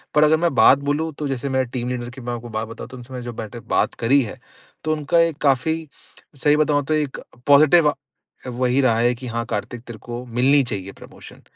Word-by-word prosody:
पर 150 - +6
अगर 155 +1 +5
मैं 170 -1 0
बात 135 - +6
बोलूँ, 160 +2 0
तो 145 +1 -4
जैसे 135 0 -3
मेरा 130 0 +1
टीम 125 -1 -3
लीडर 120 -1 -4
की 130 +2 -11
मैं 120 0 -4
आपको 120 0 -7
बात 110 0 -3
बताऊँ, 115 +1 -9
तो 130 - -10
उनसे 125 +1 -12
मैंने 125 -1 -6
जो 120 - -5
बैठ 110 -1 -7
के 120 - -7 0.2
बात - - +2
करी 135 +5 +5
है, 120 +3 -8 0.4
तो 155 0 +1
उनका 150 +2 +1
एक 165 -3 +2
काफ़ी 155 +4 +1 0.6
सही 150 0 +4
बताऊँ, 150 -2 +2
तो 155 - -1
एक 150 -3 -1 0.3
पॉज़िटिव 150 +3 +6
अ, - - -1 0.6
वही 125 +2 +1
रहा 115 -4 +3
है 120 +1 +2
कि, 125 +1 -8
"हाँ, 115 0 -3
कार्तिक 115 +1 -4
तेरे 115 -3 -9
को 120 0 -7
मिलनी 130 +4 +3
चाहिए 100 -5 -5
प्रमोशन।" - - -13
130 Hz, 235 wpm, -21 LUFS, 120-150 Hz, 0.6 s, पर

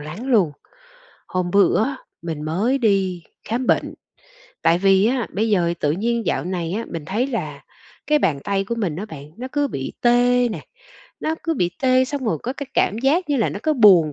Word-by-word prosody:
lắng 155 - -7
luôn. 205 - +3 0.8
Hôm 180 -1 -1
bữa 200 +2 +4
á, 275 +2 -3 0.3
mình 160 -3 -4
mới 200 - 0
đi 195 -6 +1 0.3
khám 245 +3 -1
bệnh, - - +1 0.7
tại 170 - +4
vì 195 +1 +4
á, 245 -1 0
bây 220 +4 +1
giờ 175 -4 +2
tự 145 - +1
nhiên 230 +5 -1
dạo - - 0
này 175 -2 -3
á, 225 +4 -2
mình 165 -3 -5
thấy 220 +7 0
là 275 - -4 0.4
cái 300 0 +3
bàn 150 - +1
tay 195 -1 0
của 235 - -3
mình 195 -10 -2
á 195 - -4
bạn 150 -6 -10
nó 250 - -5
cứ 290 -1 +1
bị 135 - -5
tê 245 0 +4
nè, - - -5 0.6
nó 315 - -1
cứ 330 -1 0
bị 175 - 0
tê 255 0 +4
xong 275 0 -4
rồi 170 -9 0
có 250 - -2
cái 280 0 -7
cảm 210 - +2
giác 315 +6 +2
như 285 - +2
là 225 - +2
nó - - -5
cứ 310 - +2
buồn 190 - +6
210 Hz, 210 wpm, -21 LUFS, 175-255 Hz, 0.8 s, buồn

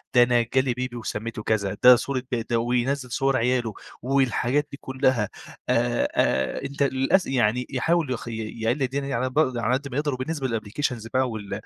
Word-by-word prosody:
ده 120 - +8
أنا 120 -1 +3
جالي 130 -1 +2
بيبي 125 0 -4
وسميته 110 -1 -5
كذا، 105 -2 0
ده 125 0 +10
صورة 130 +1 -2
بد 115 -1 -2
وينزّل 125 +3 0
صور 135 +2 +1
عياله 120 -2 0 0.3
والحاجات 135 +2 +1
دي 140 - -7
كلّها، 130 -5 +1 0.4
آآ 120 0 +2
آآ، 65 0 +1
أنت 140 +1 -2
للأس 135 +7 +2
يعني 125 -1 +1
يحاول 155 +2 +1
يخ 120 -2 -4
ي - - -4 0.3
يقلل 120 +5 +1
الدنيا 135 +2 -2
دي 140 - -3
على 125 +2 0
ب 135 +4 0 0.2
على 120 +1 0
قدّ 140 +2 -1
ما 125 - -3
يقدر، 145 -1 0
وبالنسبة 135 +2 -3
للأبليكيشنز 115 +1 -3
بقى 130 +2 +1
وال 105 -3 -5
125 Hz, 185 wpm, -25 LUFS, 115-135 Hz, 0.4 s, ده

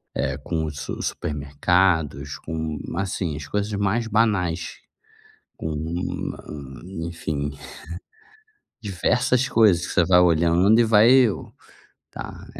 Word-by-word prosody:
eh, 65 0 -1
com 80 +2 -3
os 75 -2 -6
su - - -5
supermercados, 75 0 0
com 80 -2 -4 0.2
assim, 95 -5 -2
as 75 0 -7
coisas 105 +4 -2
mais 100 +3 0
banais. 100 -7 0 0.8
Com 80 -1 -4 1.3
enfim. 80 -4 -3 1.3
Diversas 125 +6 +1
coisas 105 - +4
que - - -6
você 85 - +3
vai 90 0 +5
olhando 85 +5 +4
e - - +5
vai 110 +1 +5
eu 125 -6 +3 0.6
"Tá, - - -8
90 Hz, 110 wpm, -23 LUFS, 80-105 Hz, 1.3 s, vai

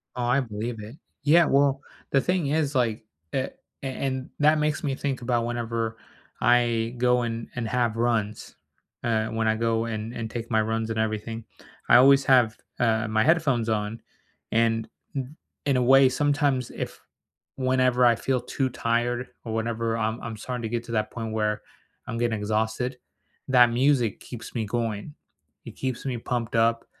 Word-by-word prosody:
Oh, 125 - -2
I 125 +3 +3
believe 115 -1 -4
it. 110 +6 -9 0.3
Yeah, 165 +3 +6
well, 140 0 +3 0.3
the 135 - +4
thing 180 -5 0
is, 145 -1 0
like, 115 -3 +1 0.3
the 130 0 -2 0.3
a - - -2
and 130 0 -3
that 150 +1 +4
makes 150 0 0
me 135 -2 0
think 135 -3 -3
about 120 -1 0
whenever 115 -1 -2 0.4
I 120 -1 +2
go 125 0 +3
and 115 -1 -3
and 115 -2 -2
have 120 -1 0
runs, 110 -3 -1 0.5
uh, 110 -2 +1
when 110 0 -1
I 110 - +3
go, 115 0 0
and 110 +1 -4
and 115 -2 -4
take 115 0 -6
my 110 0 +4
runs 110 +1 -1
and 110 0 -2
everything. 110 +1 -2 0.4
I - - +8
always 135 +2 +7
have, 125 -4 +4 0.2
uh, 110 -2 +2
my 110 0 +2
headphones 135 -9 +2
on, 110 +1 -2 0.5
and, 115 0 +2 0.3
n 135 +3 -4 0.3
in 135 -3 +2
a - - +2
way, 135 +1 +7
sometimes 140 -2 +1
if - - -6 0.6
whenever 130 -1 +3
I 120 -1 +6
feel 130 +2 -1
too 130 +1 -1
tired, 120 +1 -1 0.2
or 110 - -4
whenever 115 0 -1
I'm 110 +1 -1
I'm 110 -2 -6
starting 125 +1 -5
to 110 - -2
get 120 0 -2
to 115 - -8
that 110 -1 0
point 115 -2 -5
where 105 -1 0 0.5
I'm 115 -2 -3
getting 115 -3 0
exhausted, 110 +4 -1 0.5
that 120 -2 +6
music 125 -3 +2
keeps 120 -3 -9
me 110 -2 -1
going. 115 +4 -3 0.5
It - - -7
keeps 130 -1 -3
me 125 -3 -2
pumped 115 -1 -3
up, 115 0 +2
120 Hz, 175 wpm, -26 LUFS, 115-130 Hz, 0.6 s, I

